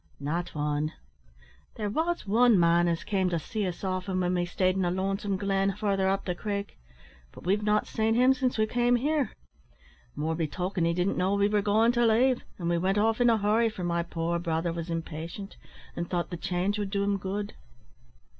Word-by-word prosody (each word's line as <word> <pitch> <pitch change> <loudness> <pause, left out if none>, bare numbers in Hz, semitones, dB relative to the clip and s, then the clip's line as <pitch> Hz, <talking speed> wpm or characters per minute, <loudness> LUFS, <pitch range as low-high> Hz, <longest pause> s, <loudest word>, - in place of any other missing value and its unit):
"Not 160 +5 -3
wan. 150 +1 -1 0.8
There 210 - -3
was 325 +9 -1
wan 225 0 +4
man 170 0 +4
as 170 -1 -1
came 190 -3 0
to 170 - 0
see 200 +5 -3
us 180 - -6
often 185 0 -2
when 180 0 +1
we 175 -1 +1
stayed 185 +1 +1
in 190 - 0
a 175 - +1
lonesome 195 +2 -1
glen 195 0 +1
further 200 -2 0
up 195 0 -1
the 180 - -1
Creek, 200 - -4 0.5
but - - -13
we've 200 +3 +2
not 210 0 +2
seen 220 0 0
him 255 +2 +5
since 255 -2 -1
we 215 - +3
came 245 +2 +2
here. 285 0 0 0.8
More 160 +2 -1
be 160 -1 -1
token 180 +2 -2
he 170 - +2
didn't 180 +2 0
know 190 +2 +1
we 200 0 +3
were 210 0 +1
goin' 215 +3 +3
to 240 0 +1
leave, 240 +3 +3
and 170 - -4
we 170 0 +1
wint 190 +3 +1
off 225 +3 +2
in 240 - +5
a 225 - +4
hurry, 215 +3 +2
for 205 -4 -7
my 170 0 0
poor 170 0 -2
brother 165 0 -1
was 170 0 -5
impatient, 165 +4 -5 0.4
and 170 0 -4
thought 175 -1 -2
the - - -3
change 180 +4 -1
would 205 -1 -2
do 200 0 0
him 200 0 +1
good." 200 +2 -4
195 Hz, 210 wpm, -28 LUFS, 175-210 Hz, 0.8 s, him